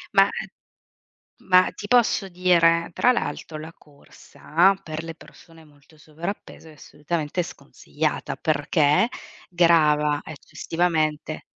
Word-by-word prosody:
Ma - - +6 1.2
ma 185 0 +5
ti 205 - -8
posso 235 -5 +2
dire? 170 -2 +2
Tra 250 - +3
l'altro 155 -7 -4
la 160 +2 -9
corsa, 155 +4 -1
per 155 -3 -6
le 165 0 -8
persone 165 0 -18
molto 145 +1 -23
sovrappeso 160 +3 -8
è - - -14
assolutamente 150 +3 -4
sconsigliata, 150 0 -5
perché 150 +5 +1 0.4
grava 150 -4 +3
eccessivamente 155 0 -3
160 Hz, 105 wpm, -23 LUFS, 150-175 Hz, 1.2 s, Ma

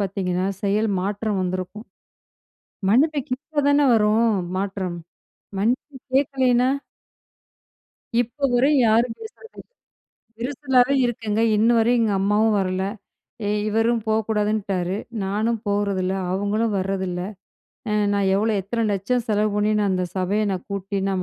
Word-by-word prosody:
பாத்தீங்கன்னா, 190 -2 -1 0.2
செயல் 210 +2 +1
மாற்றம் 205 +1 -2
வந்திருக்கும். 185 +4 -4 1.0
மன்னிப்பு 290 +6 +3
கேட்ட 290 +4 -5
தானே 285 0 +4
வரும் 220 +1 +3 0.3
மாற்றம்? 190 -3 -3 0.6
மன்னிப்பு 250 +7 -1 0.2
கேக்கலேனா? 260 -2 +3 1.5
இப்ப 245 +4 -1
வரையும் 270 +2 +4
யாரும் 225 +2 +3
பேசரதுல்ல, 450 +1 -12 0.7
விரிசலாவே 265 +1 +2
இருக்குங்க. 225 -3 -2 0.2
இன்னு 225 +3 +4
வரையும் 235 +2 +3
எங்க 220 - +1
அம்மாவும் 210 +2 +2
வரல. 185 0 -1 0.6
இ - - -1 0.2
இவரும் 225 +2 +1
போகக்கூடாதுன்ட்டாரு, 210 -4 0 0.3
நானும் 215 +4 0
போகறதில்ல, 200 -2 0 0.2
அவுங்களும் 205 +3 0
வர்றதில்ல. 190 -2 -2 0.7
அ - - 0 0.2
"நான் 200 -1 +1
எவ்வளோ, 215 +3 +1
எத்தனை 230 +5 -2
லட்சம் 220 +5 -1
செலவு 210 0 +1
பண்ணி, 210 +1 +2
நான் 205 -1 +1
அந்த 185 -1 0
சபைய 190 +3 0
நான் 185 -2 -3
கூட்டி, 200 0 -4
நான் 190 -1 -1
215 Hz, 120 wpm, -23 LUFS, 195-240 Hz, 1.5 s, தானே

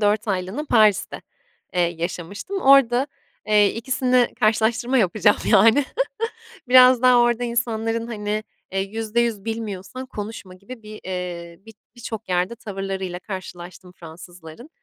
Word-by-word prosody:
4 210 +1 +1
aylığına 190 +9 -2
Paris'te, 215 -4 +3 0.5
eee, 180 - +1
yaşamıştım. 175 - -3
Orada, 270 -2 +5 0.4
eee, 210 -1 +4
2'sini 250 +1 +1
karşılaştırma 225 +4 +2
yapacağım 205 +1 +3
yani. 225 +7 +5 0.8
Biraz 255 -1 +7
daha 250 -1 +6
orada 240 0 +2
insanların, 230 -1 -2
hani, 210 -1 -3 0.3
eee, 195 - -1
%100 220 +1 -2
bilmiyorsan 225 +2 -5
konuşma 205 -5 -8
gibi 220 +5 -12
bir, 215 0 -10
eee, 175 -2 -6
bi 225 - -12 0.2
birçok 220 -4 -7
yerde 180 +5 0
tavırlarıyla 195 -4 -5
karşılaştım 180 -2 -9
Fransızların. 175 - -12
215 Hz, 115 wpm, -22 LUFS, 185-235 Hz, 0.8 s, Biraz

